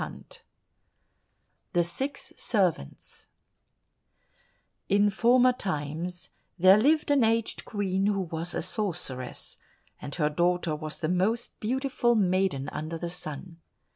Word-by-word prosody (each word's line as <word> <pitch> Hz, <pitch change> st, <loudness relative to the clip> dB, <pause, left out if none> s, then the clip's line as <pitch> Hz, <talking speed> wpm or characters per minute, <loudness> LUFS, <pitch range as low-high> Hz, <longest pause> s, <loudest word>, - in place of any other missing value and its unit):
134 -, -, -9 dB, 1.3 s
The 175 Hz, -1 st, +3 dB
Six 265 Hz, +12 st, -3 dB
Servants 180 Hz, -, -1 dB, 1.6 s
In 205 Hz, +1 st, +4 dB
former 245 Hz, +5 st, +4 dB
times 175 Hz, -, -4 dB, 0.3 s
there 185 Hz, +3 st, +7 dB
lived 300 Hz, +5 st, +3 dB
an 280 Hz, -4 st, +4 dB
aged 225 Hz, 0 st, 0 dB
Queen 195 Hz, -2 st, -1 dB
who 200 Hz, -2 st, +1 dB
was 165 Hz, -1 st, -4 dB
a -, -, -1 dB
sorceress, 175 Hz, -, -4 dB, 0.4 s
and 140 Hz, -, -6 dB
her 150 Hz, -3 st, +1 dB
daughter 175 Hz, 0 st, +1 dB
was 155 Hz, 0 st, -6 dB
the 155 Hz, -, 0 dB
most 195 Hz, +7 st, 0 dB
beautiful 250 Hz, 0 st, +1 dB
maiden 185 Hz, -8 st, +1 dB
under 155 Hz, +2 st, -5 dB
the 170 Hz, +1 st, -4 dB
sun. 165 Hz, 0 st, -5 dB
185 Hz, 115 wpm, -28 LUFS, 165-220 Hz, 1.6 s, there